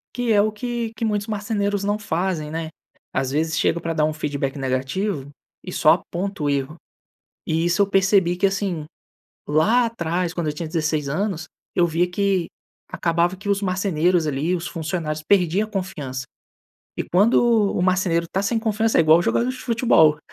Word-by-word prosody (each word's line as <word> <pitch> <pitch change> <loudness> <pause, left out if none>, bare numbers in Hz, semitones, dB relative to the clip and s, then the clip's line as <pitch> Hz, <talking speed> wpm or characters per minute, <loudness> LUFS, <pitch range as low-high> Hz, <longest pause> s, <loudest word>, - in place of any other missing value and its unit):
Que 245 -2 0
é 205 - +5
o 215 +1 +1
que 235 +1 -4
que 225 - -2
muitos 210 -1 -1
marceneiros 205 -2 -1
não 205 +1 0
fazem, 175 -5 -2
né? 160 0 -4 0.4
Às 135 -1 -1
vezes, 160 +2 0
chega 170 - +1
pra 165 0 -3
dar 155 -1 +1
feedback 145 -2 -3
negativo 135 +5 -2 0.3
e 180 - -7
só 155 -3 +5
aponta 180 +1 -4
o 145 - +1
erro. 140 +2 -1 0.7
E 160 +1 0
isso 175 +3 +2
eu 200 - +3
percebi 190 -2 +3
que 195 - +2
assim: 195 -5 -2 0.6
lá 220 +11 +3
atrás, 175 -5 -2
quando 170 -3 -2
eu - - 0
tinha 160 +2 -5
16 155 -3 -1
anos, 175 +2 -2 0.3
eu 175 - +3
via 170 +2 +1
que 195 -2 +1 0.4
acabava 170 +2 0
que 200 +2 -8
os 200 0 +2
marceneiros 180 -3 +1
ali, 150 +5 0
os 170 -1 -3
funcionários, 160 -2 -3
perdiam 195 +2 +2
a - - -21
confiança. 145 - -4 0.7
E - - -1
quando 200 +7 +3 0.4
o - - -1
marceneiro 180 -2 +1
tá 195 - 0
sem 215 +3 0
confiança, 220 0 +1
é - - +7
igual 160 +1 +6
o - - +1
jogador 240 +7 +1
de 255 - -3
futebol. 230 - +3
175 Hz, 180 wpm, -22 LUFS, 155-200 Hz, 0.7 s, é